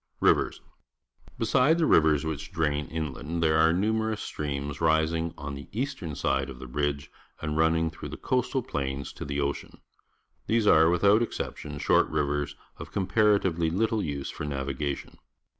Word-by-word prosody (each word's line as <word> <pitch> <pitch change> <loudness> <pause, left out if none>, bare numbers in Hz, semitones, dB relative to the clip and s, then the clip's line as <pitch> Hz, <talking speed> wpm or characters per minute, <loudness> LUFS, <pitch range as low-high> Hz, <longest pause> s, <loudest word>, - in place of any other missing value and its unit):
Rivers. - - +2 0.4
— - - -28
Besides 130 +7 +3
the 165 - +2
rivers 80 - +4
which 80 -3 -4
drain 75 -2 0
inland, 80 +1 -3
there 80 -1 +3
are 80 +1 +5
num 105 +6 +1
erous 110 -1 -1
streams 70 -4 -4
rising 80 +1 +2
on 70 -1 -6
the 70 +1 -8
eastern 115 - -3
side 70 0 0
of 65 - -8
the 65 - -9
ridge 70 +2 -2 0.3
and 75 -1 -3
running 80 0 +2
through 80 - -8
the - - -7
coastal - - 0
plain 70 0 -3
to - - -8
the 70 0 -3
ocean. 70 0 -3 0.7
These 115 -1 +2
are, 80 -4 +6
without 100 +5 +4
exception, 75 -9 -4
short - - +3
rivers 75 0 -1 0.2
of - - -9
comparatively 95 -4 +2
Iittl_e__use 90 -7 -1
for - - -6
navigation. 70 0 -4
80 Hz, 160 wpm, -27 LUFS, 70-95 Hz, 0.7 s, are